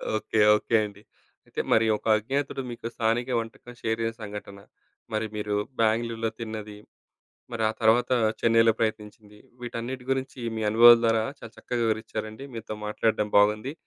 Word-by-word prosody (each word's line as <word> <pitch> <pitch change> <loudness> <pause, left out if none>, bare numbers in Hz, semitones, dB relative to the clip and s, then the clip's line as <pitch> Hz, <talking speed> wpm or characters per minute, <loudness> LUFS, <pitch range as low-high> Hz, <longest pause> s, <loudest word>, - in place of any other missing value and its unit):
Okay. 110 0 -1 0.2
Okay. 110 +2 -1
అండి. 100 0 -11 0.4
అయితే - - -3
మరి 115 0 +4
ఒక - - -24
అజ్ఞాతుడు 135 +5 -2
మీకు 115 -1 -6
స్థానిక 115 +2 0
వంటకం 115 +2 -8
షేర్ 110 0 -1
జేసిన 115 0 -3
సంఘటన, 100 -1 -8 0.5
మరి 110 0 -1
మీరు 105 -1 -2 0.3
బ్యాంగ్‌ళూర్‌లో 115 0 +1
తిన్నది, 110 -2 -6 0.8
మరా 110 -2 +1
తరువాత 120 +3 +3 0.3
చెన్నైలో 115 -1 +4
ప్రయత్నించింది. 105 -1 -4 0.2
వీటన్నిటి 120 +1 -5
గురించి 135 0 -3 0.2
మీ 110 - -2
అనుభవాల 120 +2 +9
ద్వారా 115 -1 +2 0.2
చాలా 115 0 -11
చక్కగా 120 -1 -3
వివరించారండి, 110 +2 -3
మీతో 115 -1 -6
మాట్లాడటం 105 0 0
బాగుంది. 105 +7 +3
115 Hz, 140 wpm, -26 LUFS, 110-115 Hz, 0.8 s, అనుభవాల